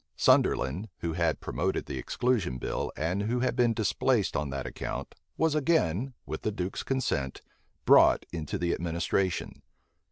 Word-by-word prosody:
Sunderland, 90 Hz, +12 st, +3 dB
who 85 Hz, -1 st, -2 dB
had 85 Hz, -2 st, 0 dB
promoted -, -, -1 dB
the 65 Hz, -, -5 dB
exclusion 100 Hz, -, 0 dB
bill, -, -, -3 dB
and 85 Hz, +6 st, -1 dB
who 120 Hz, +4 st, 0 dB
had 130 Hz, -, +1 dB
been 120 Hz, -2 st, +3 dB
displaced 115 Hz, +1 st, +1 dB
on 75 Hz, -, -1 dB
that 70 Hz, 0 st, -4 dB
account, -, -, -5 dB, 0.2 s
was 160 Hz, -1 st, +2 dB
again, 135 Hz, -, +1 dB
with -, -, -5 dB
the 110 Hz, -, -1 dB
duke's 95 Hz, -2 st, -3 dB
consent, 95 Hz, -, -2 dB, 0.4 s
brought -, -, +6 dB
into 85 Hz, +4 st, -3 dB
the 85 Hz, -2 st, 0 dB
administration. 85 Hz, +2 st, -1 dB
95 Hz, 150 wpm, -29 LUFS, 80-120 Hz, 0.4 s, brought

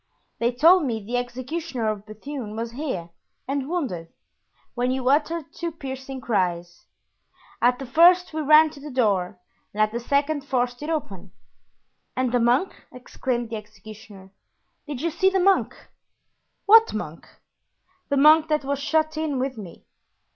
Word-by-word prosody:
They 235 Hz, +1 st, +1 dB
told 330 Hz, +8 st, +5 dB
me 225 Hz, -5 st, -3 dB
the 245 Hz, +3 st, -2 dB
executioner 255 Hz, +1 st, -4 dB
of 210 Hz, -1 st, -3 dB
Bethune 215 Hz, 0 st, -7 dB
was 230 Hz, +1 st, -4 dB
here 235 Hz, -, -5 dB, 0.4 s
and 275 Hz, +1 st, -2 dB
wounded, 255 Hz, -, -3 dB, 0.7 s
when 245 Hz, 0 st, -1 dB
you 260 Hz, 0 st, -2 dB
uttered 305 Hz, +3 st, 0 dB
two 340 Hz, -1 st, -4 dB
piercing 265 Hz, -3 st, -7 dB
cries. 175 Hz, -6 st, -2 dB, 0.7 s
At 245 Hz, +1 st, +3 dB
the 270 Hz, -, -7 dB
first 345 Hz, +7 st, +5 dB
we 315 Hz, -, -2 dB
ran 305 Hz, +1 st, +6 dB
to 290 Hz, -, -13 dB
the 295 Hz, +2 st, -9 dB
door 205 Hz, -8 st, 0 dB, 0.3 s
and 210 Hz, -, -9 dB
at 215 Hz, 0 st, +3 dB
the 235 Hz, -, -3 dB
second 285 Hz, +4 st, 0 dB
forced 245 Hz, -2 st, -2 dB
it 300 Hz, -, -5 dB
open." 200 Hz, -, -5 dB, 0.8 s
"And 255 Hz, -2 st, 0 dB
the 245 Hz, -, +2 dB
monk?" 245 Hz, +10 st, +2 dB, 0.2 s
exclaimed 245 Hz, -1 st, -4 dB
the 225 Hz, -, -3 dB
executioner, 210 Hz, -2 st, -13 dB, 0.6 s
"did 285 Hz, -3 st, -5 dB
you 335 Hz, -, 0 dB
see 380 Hz, +4 st, +2 dB
the 385 Hz, 0 st, 0 dB
monk?" 385 Hz, +1 st, +2 dB, 0.9 s
"What 450 Hz, +2 st, +6 dB
monk?" -, -, -6 dB, 0.8 s
"The 280 Hz, -, +1 dB
monk 305 Hz, +3 st, +6 dB
that 305 Hz, -3 st, 0 dB
was 280 Hz, 0 st, -2 dB
shut 310 Hz, +1 st, 0 dB
in 310 Hz, -3 st, -2 dB
with 260 Hz, +1 st, -2 dB
me." 195 Hz, -6 st, -11 dB
260 Hz, 155 wpm, -24 LUFS, 225-310 Hz, 0.9 s, ran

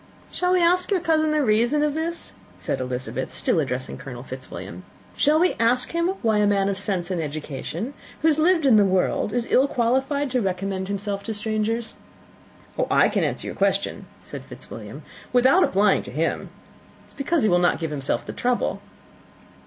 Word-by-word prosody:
"Shall 360 Hz, 0 st, 0 dB
we 360 Hz, -1 st, +3 dB
ask 360 Hz, +2 st, +3 dB
your 395 Hz, -3 st, +2 dB
cousin 315 Hz, -2 st, +2 dB
the 305 Hz, -1 st, +2 dB
reason 240 Hz, +6 st, +2 dB
of 300 Hz, -1 st, +1 dB
this?" 330 Hz, +2 st, -2 dB, 0.2 s
said -, -, -3 dB
Elizabeth, 125 Hz, 0 st, -4 dB
still -, -, +1 dB
addressing 125 Hz, +1 st, -3 dB
Colonel 125 Hz, -2 st, -8 dB
Fitzwilliam. 95 Hz, -9 st, -8 dB, 0.3 s
"Shall 305 Hz, +2 st, +3 dB
we 360 Hz, +2 st, +3 dB
ask 240 Hz, +2 st, +2 dB
him 335 Hz, +2 st, 0 dB
why 220 Hz, -2 st, +3 dB
a 205 Hz, -, +3 dB
man 200 Hz, -1 st, +2 dB
of 195 Hz, -1 st, -2 dB
sense 190 Hz, -3 st, -1 dB
and 175 Hz, -3 st, -1 dB
education, 150 Hz, +1 st, -5 dB
and 265 Hz, +5 st, -5 dB, 0.3 s
who -, -, +5 dB
has 310 Hz, -1 st, +3 dB
lived 330 Hz, -1 st, +3 dB
in 245 Hz, -5 st, +6 dB
the 205 Hz, -, +6 dB
world, 190 Hz, +2 st, +1 dB
is 240 Hz, +1 st, -1 dB
ill 265 Hz, +2 st, +5 dB
qualified 265 Hz, +3 st, 0 dB
to 250 Hz, -1 st, +1 dB
recommend 190 Hz, 0 st, -2 dB
himself 200 Hz, 0 st, -3 dB
to 220 Hz, -, -3 dB
strangers?" 220 Hz, +2 st, -2 dB, 0.9 s
"I -, -, +4 dB
can -, -, 0 dB
answer -, -, -2 dB
your -, -, -5 dB
question," -, -, 0 dB, 0.2 s
said -, -, -8 dB
Fitzwilliam, -, -, -10 dB, 0.3 s
"without 260 Hz, +9 st, +5 dB
applying 200 Hz, +1 st, +3 dB
to -, -, -10 dB
him. -, -, -2 dB, 0.6 s
It -, -, -26 dB
is -, -, -15 dB
because 295 Hz, +2 st, 0 dB
he 215 Hz, -, +4 dB
will 175 Hz, -1 st, +4 dB
not 175 Hz, 0 st, +2 dB
give 160 Hz, -2 st, -4 dB
himself 140 Hz, -2 st, -2 dB
the -, -, -6 dB
trouble." 245 Hz, 0 st, -1 dB
220 Hz, 190 wpm, -24 LUFS, 185-295 Hz, 0.9 s, in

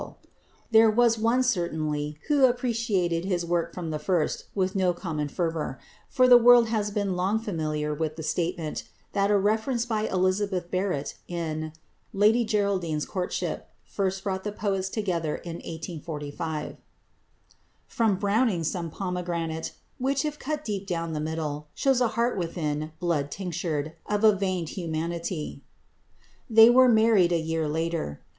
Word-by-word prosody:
One -, -, -8 dB, 0.6 s
there 225 Hz, 0 st, +7 dB
was, 230 Hz, 0 st, +3 dB, 0.2 s
certainly, 155 Hz, -8 st, -1 dB
who 285 Hz, -3 st, +5 dB
appreciated 230 Hz, -9 st, 0 dB
his 180 Hz, -3 st, -1 dB
work 170 Hz, 0 st, 0 dB
from 170 Hz, -3 st, -5 dB
the 155 Hz, -, -2 dB
first 175 Hz, -4 st, 0 dB
with 190 Hz, -1 st, 0 dB
no 185 Hz, -2 st, +2 dB
common 160 Hz, -4 st, -3 dB
fervour, 160 Hz, -3 st, -2 dB, 0.3 s
for 255 Hz, 0 st, +4 dB
the 245 Hz, -1 st, +9 dB
world 240 Hz, -1 st, +7 dB
has 210 Hz, -2 st, -1 dB
long 195 Hz, 0 st, 0 dB
been 220 Hz, -, -7 dB
familiar 155 Hz, -5 st, -2 dB
with 155 Hz, 0 st, -2 dB
the 160 Hz, -, -6 dB
statement 165 Hz, 0 st, -2 dB, 0.3 s
that 200 Hz, 0 st, +2 dB
a 205 Hz, -, +4 dB
reference 220 Hz, +4 st, +1 dB
by 220 Hz, -3 st, -1 dB
Elizabeth 185 Hz, -1 st, 0 dB
Barrett 185 Hz, -6 st, -2 dB
in 160 Hz, -2 st, -3 dB, 0.4 s
"Lady 215 Hz, +4 st, +4 dB
Geraldine's 195 Hz, -8 st, 0 dB
Courtship" 180 Hz, -2 st, -3 dB, 0.2 s
first 190 Hz, -1 st, -2 dB
brought 190 Hz, -1 st, -2 dB
the 210 Hz, -, -2 dB
two 210 Hz, -, -10 dB
poets 195 Hz, -2 st, -1 dB
together 175 Hz, -8 st, -1 dB
in 170 Hz, -1 st, -7 dB
1845 160 Hz, -1 st, -5 dB, 1.1 s
"From 225 Hz, -6 st, +1 dB
Browning 205 Hz, -2 st, +1 dB
some 165 Hz, +1 st, -2 dB
'Pomegranate' 170 Hz, -2 st, -3 dB, 0.3 s
Which, 270 Hz, +2 st, 0 dB
if 300 Hz, -1 st, -3 dB
cut 300 Hz, +1 st, -3 dB
deep 200 Hz, -2 st, -3 dB
down 165 Hz, -3 st, -2 dB
the 155 Hz, -, -2 dB
middle, 150 Hz, -1 st, -3 dB
Shows 270 Hz, -2 st, +2 dB
a 245 Hz, -, +4 dB
heart 235 Hz, -3 st, +1 dB
within 155 Hz, -3 st, -2 dB
blood 160 Hz, -5 st, 0 dB
tinctured, 160 Hz, -3 st, -3 dB
Of 210 Hz, +1 st, -1 dB
a 215 Hz, -2 st, +7 dB
veined 185 Hz, -4 st, -2 dB
humanity." 170 Hz, -1 st, -4 dB, 0.9 s
They 225 Hz, +1 st, +8 dB
were 255 Hz, +1 st, +6 dB
married 220 Hz, -6 st, +4 dB
a 170 Hz, -, +3 dB
year 160 Hz, -1 st, -1 dB
later. 160 Hz, -, -2 dB
180 Hz, 150 wpm, -26 LUFS, 160-215 Hz, 1.1 s, the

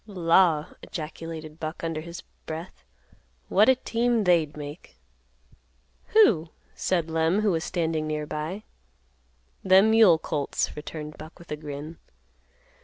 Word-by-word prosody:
"Law!" 170 Hz, -4 st, +3 dB, 0.2 s
ejaculated 160 Hz, 0 st, -7 dB
Buck, 155 Hz, +2 st, -5 dB
under 165 Hz, -1 st, -2 dB
his 170 Hz, +1 st, -9 dB, 0.2 s
breath; 160 Hz, +3 st, -7 dB, 0.7 s
"what 210 Hz, +5 st, +5 dB
a 260 Hz, -, +6 dB
team 235 Hz, -2 st, 0 dB
they'd 165 Hz, -5 st, +2 dB
make!" 145 Hz, +3 st, -9 dB, 1.1 s
"Who?" 205 Hz, -, +4 dB, 0.2 s
said 170 Hz, -3 st, -1 dB
Lem, 165 Hz, +5 st, +2 dB
who 210 Hz, -2 st, +2 dB
was 165 Hz, -2 st, -1 dB
standing 160 Hz, -4 st, -1 dB
near 150 Hz, 0 st, -2 dB
by. 155 Hz, +8 st, -5 dB, 1.0 s
"Them 195 Hz, +3 st, +6 dB
mule 220 Hz, -7 st, +6 dB
colts," 150 Hz, -3 st, -2 dB
returned 150 Hz, 0 st, -7 dB
Buck 155 Hz, +2 st, -11 dB
with 170 Hz, -, -15 dB
a -, -, -1 dB
grin. 150 Hz, +1 st, -8 dB
165 Hz, 125 wpm, -26 LUFS, 155-185 Hz, 1.1 s, a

